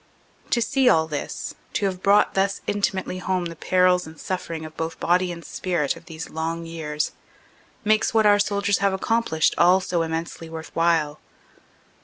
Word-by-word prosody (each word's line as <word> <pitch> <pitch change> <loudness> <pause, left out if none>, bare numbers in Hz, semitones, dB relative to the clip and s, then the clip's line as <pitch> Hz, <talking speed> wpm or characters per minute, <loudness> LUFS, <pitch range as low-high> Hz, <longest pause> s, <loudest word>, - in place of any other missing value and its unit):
To 235 - +2
see 265 +2 +3
all 160 -6 +4
this, 155 -2 -5 0.2
to - - 0
have 185 -2 -2
brought 200 +2 +4
thus 195 0 0
intimately 190 -2 -1
home 185 -1 -1
the 165 -1 -5
perils 180 0 +2
and 160 0 -12
sufferings 165 -4 -4
of 155 0 -10
both 165 0 -4
body 180 +1 +2
and 170 -2 -8
spirit 170 -5 -1
of - - -14
these 165 -1 -8
long 165 +1 -3
years, 155 -2 -3 0.7
makes 215 0 +3
what 220 -1 +3
our 205 0 +6
soldiers 200 0 +1
have 200 -1 +2
accomplished 190 -5 +1
all 180 +2 +6
so 180 -2 -1
immensely 165 0 -4
worth 160 0 -8
while. 165 -3 +2
175 Hz, 170 wpm, -24 LUFS, 160-195 Hz, 0.7 s, our